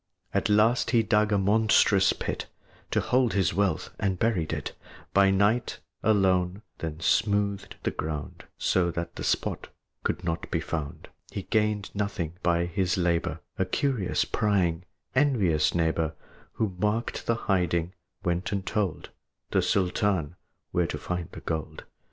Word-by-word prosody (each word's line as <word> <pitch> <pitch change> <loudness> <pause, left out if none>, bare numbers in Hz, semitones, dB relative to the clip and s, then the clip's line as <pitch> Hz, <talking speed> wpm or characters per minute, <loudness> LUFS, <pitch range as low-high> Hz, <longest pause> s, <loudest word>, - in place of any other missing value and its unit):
At - - +1
last 110 +4 +4
he 115 -1 +4
dug 105 0 +2
a 100 - +4
monstrous 100 -1 +4
pit - - -4 0.4
To - - +1
hold 125 -2 +2
his 95 -3 +2
wealth, 100 +1 0
and 95 -2 0
buried 95 -7 0
it - - -3 0.4
By 100 0 +6
night, 100 +5 +2 0.2
alone; 95 -2 +2 0.2
then 80 -1 -4
smoothed 100 +1 +1
the - - 0
ground 75 -1 -5
So 90 -2 +2
that 85 0 -4
the - - -5
spot - - -1 0.4
could - - -1
not 85 -1 -2
be - - 0
found. 75 -4 -5 0.2
But - - -20
he 100 - -3
gained 105 -1 0
nothing 100 -5 -2
by 85 -1 +2
his 90 +1 0
labor: 85 -2 0 0.2
A 95 - +3
curious, 120 0 0
prying, 95 -5 +1 0.3
envious 105 - +2
neighbor, 80 -2 +1 0.4
Who 105 -5 -1
marked 105 +4 -1
the 115 - +3
hiding, 90 -5 0 0.3
went 85 +1 -1
and 100 -2 -2
told 100 -7 -2 0.4
The - - +3
Sultan 90 -3 +1 0.4
where 90 -1 +1
to 75 - -3
find 90 +2 -4
the - - -9
gold. 80 -2 -4
95 Hz, 150 wpm, -27 LUFS, 85-105 Hz, 0.4 s, By